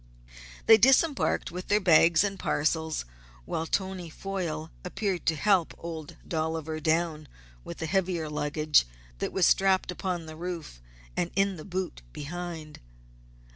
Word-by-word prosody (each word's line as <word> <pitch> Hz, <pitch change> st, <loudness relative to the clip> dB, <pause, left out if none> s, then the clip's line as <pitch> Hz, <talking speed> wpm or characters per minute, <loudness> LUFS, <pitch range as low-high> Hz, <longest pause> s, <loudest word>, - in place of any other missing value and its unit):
They 225 Hz, -1 st, +8 dB
disembarked 270 Hz, -, +3 dB
with 180 Hz, +1 st, -6 dB
their 210 Hz, -, +4 dB
bags 165 Hz, -2 st, +5 dB
and 195 Hz, -1 st, -2 dB
parcels, 160 Hz, -, 0 dB, 0.4 s
while 160 Hz, -, -2 dB
Tony 190 Hz, -2 st, -2 dB
Foyle 165 Hz, -3 st, -4 dB
appeared 185 Hz, 0 st, -2 dB
to 160 Hz, -, +3 dB
help 190 Hz, -1 st, +2 dB
Old 160 Hz, -3 st, -7 dB
Dolliver 160 Hz, -1 st, -2 dB
down 160 Hz, -1 st, 0 dB, 0.4 s
with -, -, -8 dB
the 160 Hz, -, -3 dB
heavier 175 Hz, -2 st, 0 dB
luggage 150 Hz, -, +2 dB, 0.3 s
that -, -, -2 dB
was 190 Hz, -, +3 dB
strapped 190 Hz, -1 st, +3 dB
upon 180 Hz, -2 st, -3 dB
the 155 Hz, 0 st, -9 dB
roof 165 Hz, -, -6 dB, 0.3 s
and 175 Hz, -, 0 dB
in 195 Hz, 0 st, +2 dB
the 155 Hz, -, -9 dB
boot 185 Hz, -, -4 dB
behind. 160 Hz, 0 st, -6 dB
170 Hz, 135 wpm, -28 LUFS, 155-190 Hz, 0.4 s, They